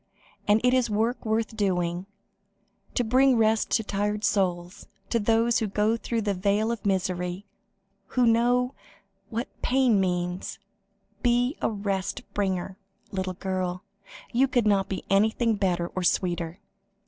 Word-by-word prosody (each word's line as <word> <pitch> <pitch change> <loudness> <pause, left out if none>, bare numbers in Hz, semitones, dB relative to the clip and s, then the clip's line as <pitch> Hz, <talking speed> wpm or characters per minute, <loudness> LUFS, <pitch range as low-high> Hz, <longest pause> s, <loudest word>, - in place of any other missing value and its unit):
And, 205 +1 +5
it 250 0 +4
is 255 -3 +2
work 225 +4 0
worth 220 0 0
doing 180 -3 -1 0.9
to 245 - +2
bring 255 +2 +4
rest 220 0 +2
to 225 - +3
tired 205 +1 -2
souls, 185 -3 -1 0.2
to 235 - +2
those 230 +2 +2
who 220 - -1
go 210 +3 +1
through 230 0 -2
the 205 -1 0
vale 205 +4 +1
of 230 -3 -3
misery, 180 0 -1 0.7
who 250 - +5
know 245 +3 +3 0.6
what 235 +3 -3
pain 250 -5 +3
means. 180 -1 -2 0.6
Be 245 +3 +2
a - - +1
rest 200 -3 -3
bringer, 190 -1 -2 0.3
little 185 -1 -3
girl; 185 -1 -3 0.5
you 260 +3 +4
could 245 -3 +1
not 200 -2 +2
be 190 - -4
anything 220 +3 +2
better 180 -4 0
or 185 - -4
sweeter." 175 -1 0
205 Hz, 140 wpm, -26 LUFS, 185-230 Hz, 0.9 s, And